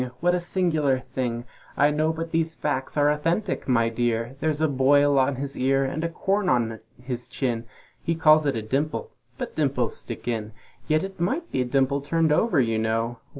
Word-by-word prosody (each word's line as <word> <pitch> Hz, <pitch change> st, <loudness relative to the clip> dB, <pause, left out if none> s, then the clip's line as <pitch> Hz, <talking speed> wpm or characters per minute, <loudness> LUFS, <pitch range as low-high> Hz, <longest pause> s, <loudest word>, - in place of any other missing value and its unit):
What 175 Hz, +1 st, +2 dB
a 180 Hz, -, +2 dB
singular 160 Hz, -7 st, +1 dB
thing! 120 Hz, -2 st, -2 dB, 0.3 s
I 145 Hz, +1 st, +4 dB
know! 155 Hz, +2 st, +1 dB
but 165 Hz, 0 st, -5 dB
these 160 Hz, -1 st, 0 dB
facts 145 Hz, -2 st, -2 dB
are 145 Hz, 0 st, +4 dB
authentic, 165 Hz, +7 st, -1 dB
my 115 Hz, -3 st, +3 dB
dear, 115 Hz, +1 st, -1 dB
There's 155 Hz, -1 st, 0 dB
a 160 Hz, -, +3 dB
boil 140 Hz, +1 st, +4 dB
on 135 Hz, +1 st, +2 dB
his 140 Hz, +2 st, -4 dB
ear; 135 Hz, +1 st, +2 dB
and 150 Hz, +4 st, -3 dB
a 170 Hz, -, 0 dB
corn 195 Hz, +3 st, 0 dB
on 115 Hz, -3 st, +1 dB, 0.2 s
his 125 Hz, -1 st, -5 dB
chin, 120 Hz, -4 st, -2 dB, 0.4 s
He 165 Hz, -, -1 dB
calls 155 Hz, -1 st, +5 dB
it 140 Hz, -, +1 dB
a 110 Hz, -, -3 dB
dimple 135 Hz, +8 st, -2 dB, 0.3 s
but -, -, -5 dB
dimples -, -, 0 dB
stick -, -, -8 dB
in 110 Hz, -2 st, -2 dB, 0.3 s
Yet 155 Hz, 0 st, +2 dB
it 195 Hz, -1 st, -7 dB
might 270 Hz, -, -1 dB
be -, -, 0 dB
a -, -, 0 dB
dimple 135 Hz, +2 st, +1 dB
turned 160 Hz, +2 st, +1 dB
over, 175 Hz, 0 st, +3 dB
you 115 Hz, -3 st, +1 dB
know! 115 Hz, +1 st, -1 dB
140 Hz, 195 wpm, -25 LUFS, 125-160 Hz, 0.4 s, calls